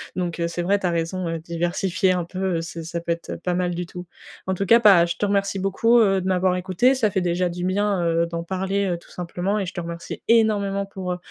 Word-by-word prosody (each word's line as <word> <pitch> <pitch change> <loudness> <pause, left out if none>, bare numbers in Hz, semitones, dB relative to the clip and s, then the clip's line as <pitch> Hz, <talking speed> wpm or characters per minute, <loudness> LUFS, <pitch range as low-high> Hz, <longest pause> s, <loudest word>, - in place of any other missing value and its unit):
Donc, 175 -2 -3
heu, 170 - +1
c'est 175 +1 -3
vrai, 200 +3 +2
tu 190 - -4
as - - 0
raison, 170 +2 -2
heu, 165 0 -3
diversifier 175 +3 0
un 180 -1 -1
peu, 185 +2 -8 0.2
heu, 165 - -2
c'est, 165 0 -7
ça 170 +1 -4
peut 170 0 -3
être 170 0 -4
pas 180 - 0
mal 175 -1 -1
du 175 0 -3
tout. 180 0 -9 0.4
En 190 - +1
tout 195 +2 -2
cas 230 +4 +6
bah, 195 -7 +6
je 170 - -4
te - - 0
remercie 200 -1 0
beaucoup, 225 +5 +3
heu, 195 -3 +3
de - - -6
m'avoir 185 -1 +2
écoutée. 185 +8 +2
Ça 220 -6 +1
fait 195 - 0
déjà 175 0 0
du 175 +1 -4
bien, 200 0 +1
heu, 165 0 +2
d'en 170 0 -4
parler, 190 +2 -1
heu, 175 -1 -1
tout - - -18
simplement 180 +4 -2
et 195 - -1
je 185 - -6
te 175 - -4
remercie 170 0 -7
énormément 205 -3 +3
pour, 190 -2 -5
heu, - - -5
180 Hz, 265 wpm, -23 LUFS, 170-195 Hz, 0.4 s, cas